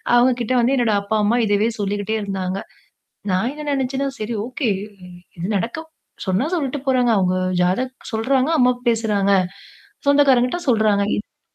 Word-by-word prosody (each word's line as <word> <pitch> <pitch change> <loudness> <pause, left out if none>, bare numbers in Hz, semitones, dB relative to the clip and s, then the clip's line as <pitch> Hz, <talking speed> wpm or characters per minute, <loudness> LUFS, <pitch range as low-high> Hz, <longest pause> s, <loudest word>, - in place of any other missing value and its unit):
அவங்க 245 +1 +5
கிட்ட 235 +2 -1
வந்து 250 +3 +2
என்னோட 235 -3 +2
அப்பா, 200 +2 -2
அம்மா 230 +4 +2
இதவே 210 +2 +2
சொல்லிக்கிட்டே 205 +2 -1
இருந்தாங்க. 195 -1 -3 0.7
நான் 190 +7 +1
என்ன 300 0 -8
நெனச்சேன்னா 270 0 -1
சரி 215 +2 -3
ஓகே 255 0 -2 0.7
இது 170 - -3
நடக்க 235 - -3 0.4
சொன்னா 190 +9 +1
சொல்லிட்டு 285 -3 -2
போறாங்க. 250 -2 +3
அவங்க 185 -1 +1 0.3
ஜாதக் 255 +9 0 0.2
சொல்றாங்க 260 +6 +1
அம்மாவு 250 -1 +3
பேசுறாங்க. 210 -3 +1 0.8
சொந்தக்காரங்கிட்ட 275 0 +4
சொல்றாங்க. 215 -4 +3
இத்தா 210 - -10
235 Hz, 140 wpm, -21 LUFS, 205-260 Hz, 0.8 s, அவங்க